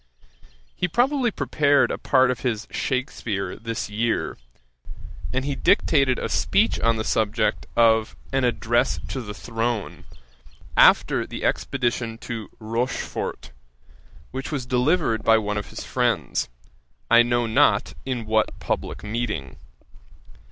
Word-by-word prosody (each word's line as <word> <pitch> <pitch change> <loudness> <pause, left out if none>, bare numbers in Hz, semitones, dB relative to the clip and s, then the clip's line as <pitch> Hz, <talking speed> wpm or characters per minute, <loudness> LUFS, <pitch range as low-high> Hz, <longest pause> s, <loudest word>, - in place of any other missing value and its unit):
He - - 0
probably 245 - +2
prepared 145 -8 +2
a - - -2
part 130 -1 +3
of 125 - -4
his 115 -4 -2
Shakspeare 110 -7 -2
this 115 0 -4
year, 110 +3 -1 1.0
and 130 +1 -1
he 145 - -1
dictated 135 -1 +3
a - - -2
speech - - +1
on 115 0 +2
the 110 - -2
subject 110 +1 0
of 110 -1 +3 0.2
an 135 0 +2
Address 120 -7 +1
to 130 - -3
the 105 -3 -7
Throne, 115 -2 -3 0.7
after - - +5
the - - -5
expedition 120 -3 -1
to 115 -2 -6
Rochfort, 115 +3 -3 0.8
which 130 +1 -5
was 140 -5 -3
delivered 125 -1 +1
by 115 0 +5
one 105 -1 -1
of 105 - -8
his - - -7
friends, - - 0 0.6
I 120 - +8
know 120 0 +1
not 110 - +3
in 125 -4 -3
what 110 0 0
publick - - -3
meeting. 105 - -3
120 Hz, 130 wpm, -24 LUFS, 110-130 Hz, 1.0 s, I